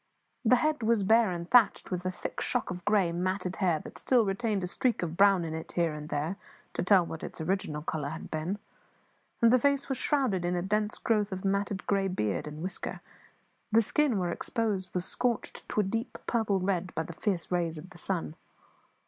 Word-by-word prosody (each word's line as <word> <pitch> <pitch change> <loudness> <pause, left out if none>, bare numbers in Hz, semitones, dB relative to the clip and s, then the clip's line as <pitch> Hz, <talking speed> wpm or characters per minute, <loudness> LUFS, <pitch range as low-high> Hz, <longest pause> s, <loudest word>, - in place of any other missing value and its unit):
The 250 +1 +6
head 300 +2 +1
was 225 -2 +2
bare, 225 +2 +5
and 170 -1 -4
thatched 235 -1 +4
with 180 0 -2
a - - 0
thick - - -5
shock - - -1
of 180 0 -6
grey, 205 -4 +3
matted 185 +1 -2
hair 180 -5 +2
that - - -10
still 245 -4 +3
retained 200 0 -1
a - - -1
streak 235 +3 0
of 165 -1 -3
brown 195 -2 +5
in 160 - -4
it 160 0 -6
here 170 -3 +1
and 150 0 -7
there 155 +6 -2 0.4
to - - -1
tell 180 -1 +5
what 165 -1 -7
its - - -7
original 160 -3 -2
colour 150 -3 -2
had 160 +2 -7
been; 160 +6 -2 0.9
and 230 +1 +7
the 255 - +6
face 280 +2 +1
was 270 - -1
shrouded 255 -11 +1
in 175 +1 0
a 175 - -1
dense 210 +2 0
growth 210 -3 +1
of 190 +1 -4
matted 200 0 0
grey 195 -1 +1
beard 105 - -1
and 150 +2 -7
whisker; 185 - -3 0.7
the 225 +1 +5
skin, 275 +1 +2
where 180 -2 0
exposed, 200 -2 -2
was 180 0 0
scorched 245 -3 -2
to 210 - +2
a - - 0
deep 225 +5 -3
purple 220 -5 +1
red 185 -1 -1
by 160 - 0
the 170 - -8
fierce 175 -1 -2
rays 170 -2 0
of 175 +5 -10
the 175 - -11
sun. 170 -5 -2
190 Hz, 210 wpm, -29 LUFS, 170-215 Hz, 0.9 s, and